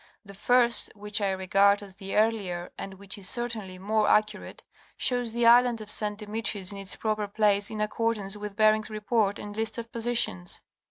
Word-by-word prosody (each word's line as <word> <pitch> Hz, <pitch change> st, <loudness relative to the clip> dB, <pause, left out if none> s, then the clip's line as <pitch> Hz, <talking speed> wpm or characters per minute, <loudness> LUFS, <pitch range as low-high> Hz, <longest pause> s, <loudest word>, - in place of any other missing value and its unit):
The 200 Hz, -, -11 dB
first, 240 Hz, +3 st, +3 dB
which 210 Hz, +1 st, 0 dB
I 200 Hz, -, +1 dB
regard 195 Hz, +2 st, +2 dB
as 195 Hz, -2 st, -13 dB
the 195 Hz, 0 st, -6 dB
earlier, 200 Hz, -5 st, 0 dB
and 195 Hz, -1 st, -8 dB
which 200 Hz, +1 st, -5 dB
is 195 Hz, -1 st, +1 dB
certainly 230 Hz, -6 st, 0 dB
more 210 Hz, +3 st, 0 dB
accu 210 Hz, 0 st, +2 dB
rate. -, -, -12 dB, 0.3 s
shows 245 Hz, -2 st, +1 dB
the 235 Hz, +1 st, 0 dB
island 240 Hz, 0 st, +5 dB
of 210 Hz, -1 st, -8 dB
St. 210 Hz, -1 st, -1 dB
Demetrius 210 Hz, -2 st, -2 dB
in 200 Hz, -, -7 dB
its 195 Hz, -1 st, -3 dB
proper 215 Hz, -1 st, -2 dB
place 205 Hz, -1 st, +1 dB
in 215 Hz, -, -6 dB
accord 230 Hz, +1 st, -1 dB
ance 195 Hz, 0 st, -2 dB
with 210 Hz, -1 st, -7 dB
Bering's 215 Hz, 0 st, +3 dB
Report 215 Hz, -1 st, 0 dB
and 205 Hz, 0 st, -8 dB
list 220 Hz, +1 st, -3 dB
of 230 Hz, 0 st, -7 dB
positions. 230 Hz, -, 0 dB
210 Hz, 195 wpm, -27 LUFS, 200-225 Hz, 0.3 s, island